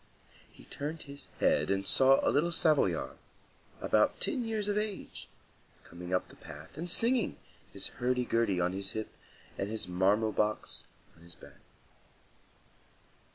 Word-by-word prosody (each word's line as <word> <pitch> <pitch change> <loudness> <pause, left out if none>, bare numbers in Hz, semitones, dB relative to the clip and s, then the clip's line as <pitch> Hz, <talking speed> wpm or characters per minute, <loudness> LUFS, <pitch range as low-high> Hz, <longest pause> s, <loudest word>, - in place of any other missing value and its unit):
He - - -16
turned 150 +3 -5
his 140 0 -10
head 75 - +3
and 100 0 0
saw 135 +5 +5
a - - +4
little 165 +4 +2
Savoyard, 155 -2 +2 0.6
about - - +3
ten 260 -5 0
years 220 -2 -2
of 205 - 0
age, 210 -2 -3 0.6
coming 90 +1 -9
up 90 - +1
the - - -16
path 75 - -11
and 170 +4 -4
singing, 235 +4 +3 0.3
his - - -4
hurdy 125 0 0
gurdy 115 -6 +1
on 90 +1 +1
his 95 0 -2
hip, 110 0 -4 0.5
and 100 - -1
his 110 -2 -2
marmot 100 +4 +2
box 105 0 -1 0.3
on 85 - -21
his 85 0 -6
back. - - -15
115 Hz, 150 wpm, -31 LUFS, -, 0.6 s, saw